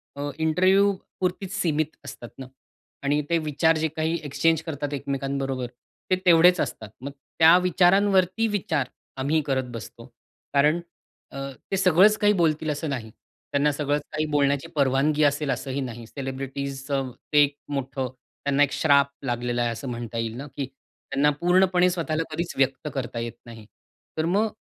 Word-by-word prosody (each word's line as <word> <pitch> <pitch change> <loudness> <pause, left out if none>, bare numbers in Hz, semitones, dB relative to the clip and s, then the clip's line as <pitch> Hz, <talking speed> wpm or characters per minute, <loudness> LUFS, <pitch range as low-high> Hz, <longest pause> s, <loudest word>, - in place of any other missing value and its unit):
अ, 145 +1 -3
interview 185 +5 +3 0.3
पुरतीच 185 +1 -2
सीमित 155 -2 0
असतात 120 -4 -9
ना? 135 - -7 0.6
आणि 145 +1 +2
ते 170 - +3
विचार 155 +1 +2
जे 160 +1 +1
काही 160 +1 0
एक्सचेंज 150 +3 +1
करतात 145 -3 -4
एकमेकांबरोबर, 135 -2 -2 0.4
ते 185 - +6
तेवढेच 175 +1 +6
असतात. 110 - -4
मग 140 +2 -5 0.3
त्या 165 +2 +8
विचारांवरती 185 +3 +3
विचार 160 - -1 0.3
आम्ही 145 +4 +1
करत 130 -3 -1
बसतो. 115 +1 -9 0.5
कारण 150 +4 +4 0.5
अ, - - -9 0.3
ते 195 - +1
सगळंच 190 +3 +5
काही 210 -1 +4
बोलतील 160 -4 +1
असं 150 +1 -3
नाही. 120 -5 -4 0.4
त्यांना 145 +1 +2
सगळंच 145 0 -1
काही 155 0 -1
बोलण्याची 140 +1 +1
परवानगी 140 +2 +2
असेल 145 0 +1
असंही 135 +2 -3
नाही. 120 -3 -6
सेलिब्रिटीजचं 135 0 -4 0.2
ते 145 - +7
एक 145 0 -1 0.2
मोठं 135 -1 -2
त्यांना 140 +3 -1
एक 140 - +1
श्राप 140 -3 +4 0.2
लागलेला 120 -1 -1
आहे, 120 -1 +1
असं 115 +4 -6
म्हणता 120 -1 -5
येईल 115 -1 -2
ना 140 +3 -6
की 140 - -1 0.5
त्यांना 140 +2 +3
पूर्णपणे 180 0 +4
स्वतःला 165 -2 -1
कधीच 170 +1 -3
व्यक्त 135 +2 +1
करता 125 -3 -4
येत 115 0 -4
नाही. 115 -2 -11 0.5
तर 155 - +1
मग 200 +6 +2
145 Hz, 155 wpm, -25 LUFS, 135-165 Hz, 0.6 s, त्या